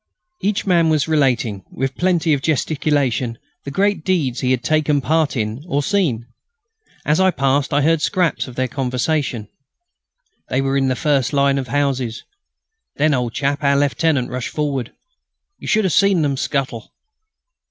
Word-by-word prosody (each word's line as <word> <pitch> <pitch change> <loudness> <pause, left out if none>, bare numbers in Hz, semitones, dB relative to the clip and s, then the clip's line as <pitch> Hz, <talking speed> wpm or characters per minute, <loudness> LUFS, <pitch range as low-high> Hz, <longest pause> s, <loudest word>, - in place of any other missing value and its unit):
Each 200 +1 -1
man 170 -4 +3
was 155 -1 +1
relating, 125 - +1
with 135 +1 -2
plenty 175 -2 +1
of 140 - 0
gesticulation, 140 -5 0 0.3
the - - -4
great 200 +4 0
deeds 155 -10 0
he 125 - -1
had 130 -2 +1
taken 155 -2 +2
part 155 0 0
in 110 +4 -3
or 145 -4 0
seen. 145 - 0 0.8
As 150 +3 +2
I 190 0 +5
passed, 140 -4 0
I 145 0 +2
heard 165 +1 +2
scraps 180 -5 0
of 125 - -10
their 130 0 0
conversation: 130 -2 -2 1.0
"They 130 - 0
were 135 0 0
in 135 -1 +2
the 130 - +1
first 140 -1 0
line 140 -1 +2
of 130 - -5
houses.... 130 -3 -1 0.7
Then, 150 +1 +2
old 125 -3 -1
chap, 140 +1 -1
our 140 0 +3
lieutenant 145 -2 +1
rushed 125 -1 -3
forward.... 140 -5 -2 0.7
You - - -9
should 215 -1 +2
have 185 -5 +1
seen 195 -5 +3
them 140 -2 0
scuttle...." 130 -5 -3
140 Hz, 165 wpm, -19 LUFS, 130-155 Hz, 1.0 s, I